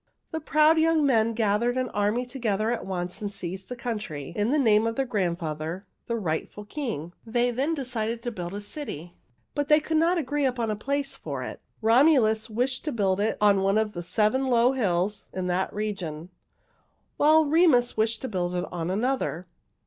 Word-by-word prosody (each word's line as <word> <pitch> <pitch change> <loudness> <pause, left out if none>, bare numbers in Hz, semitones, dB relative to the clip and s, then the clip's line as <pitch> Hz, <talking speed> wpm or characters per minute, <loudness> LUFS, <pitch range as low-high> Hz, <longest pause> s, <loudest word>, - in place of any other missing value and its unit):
"The 320 - -2
proud 310 +1 +4
young 320 -2 +3
men 230 -4 +3
gathered 225 +3 +1
an 255 -1 -1
army 210 +4 0
together 230 -4 -1
at 240 - -3
once 180 0 -4
and 205 -1 -3
seized 190 0 -6
the 250 - -4
country 210 - -5
in 210 +2 +1
the 295 - +2
name 220 -5 +4
of 230 - -2
their 270 - 0
grandfather, 170 -5 -2 0.2
the 235 - -1
rightful 200 +1 -3
king. 210 - -5
They 240 +2 +1
then 275 +7 0
decided 235 -4 -3
to 240 - -2
build 180 -3 -6
a 205 - -5
city, 205 - -7 0.4
but 290 -1 -1
they 300 0 +6
could 315 +1 -1
not 335 +3 +3
agree 290 -2 0
upon 240 -4 0
a - - -1
place 275 +5 -2
for - - -5
it. - - -7 0.2
Romulus 225 -3 +4
wished 250 +4 -1
to 305 - -1
build 195 -5 +1
it 215 +2 0
on 205 -2 +4
one 195 +2 +2
of 220 -1 0
the 175 - -5
seven 215 +9 +1
low 245 0 +4
hills 200 -5 0
in 185 -1 -3
that 180 +1 0
region, 185 -6 -4 0.9
while 310 +1 +5
Remus 290 -6 +4
wished 220 0 +1
to - - -1
build 180 -4 -2
it 180 0 -1
on 170 -1 -3
another. 215 -4 -1
220 Hz, 190 wpm, -26 LUFS, 195-260 Hz, 0.9 s, they